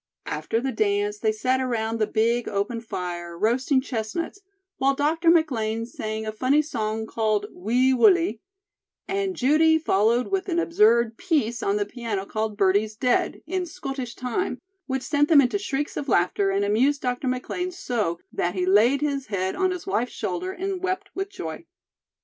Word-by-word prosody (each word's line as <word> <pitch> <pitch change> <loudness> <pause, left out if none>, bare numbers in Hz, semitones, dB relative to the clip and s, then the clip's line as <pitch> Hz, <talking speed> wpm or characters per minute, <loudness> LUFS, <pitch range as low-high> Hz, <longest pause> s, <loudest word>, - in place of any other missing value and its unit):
After 225 - -2
the 265 +2 -2
dance, 205 -2 0
they 220 0 +2
sat 255 +4 0
around 230 -3 -1
the 215 - +2
big 230 +3 +1
open 210 +3 -2
fire, 175 -5 -5
roasting 255 - +2
chestnuts, 260 - -4 0.4
while 275 +1 +2
Dr. 320 +4 +2
McLean 230 -9 +2
sang 220 -2 -5
a 215 - -2
funny 260 +7 +2
song 220 -6 -3
called 215 -2 0
"Wee 245 +8 +2
Wullie," 330 - +4 0.7
and 390 -1 -1
Judy 315 +4 +4
followed 235 -4 +2
with 390 0 -1
an 340 - 0
absurd 235 -8 +3
"piece" 270 -10 0
on 200 - +1
the 205 -1 0
piano 210 -3 -4
called 215 0 -3
"Birdie's 205 +2 +2
Dead," 250 +2 0
in 370 +4 -2
schottische 270 -7 -6
time, 255 +10 -2 0.3
which 265 -1 -2
sent 290 0 +1
them 310 -3 +7
into 280 +9 +2
shrieks 290 -6 -3
of 280 - -4
laughter 195 +1 +2
and 200 +1 +1
amused 260 +8 +2
Dr. 250 +1 -2
McLean 255 +8 -2
so 240 - -2 0.2
that 175 +2 -1
he 180 -1 0
laid 225 +9 +4
his 280 -2 -1
head 190 -2 -2
on 375 -1 +1
his 365 -2 -4
wife's 250 -10 -1
shoulder 370 +2 -3
and 380 0 -4
wept 375 +2 -2
with 390 +1 -3
joy. 165 - -7
245 Hz, 170 wpm, -25 LUFS, 215-300 Hz, 0.7 s, them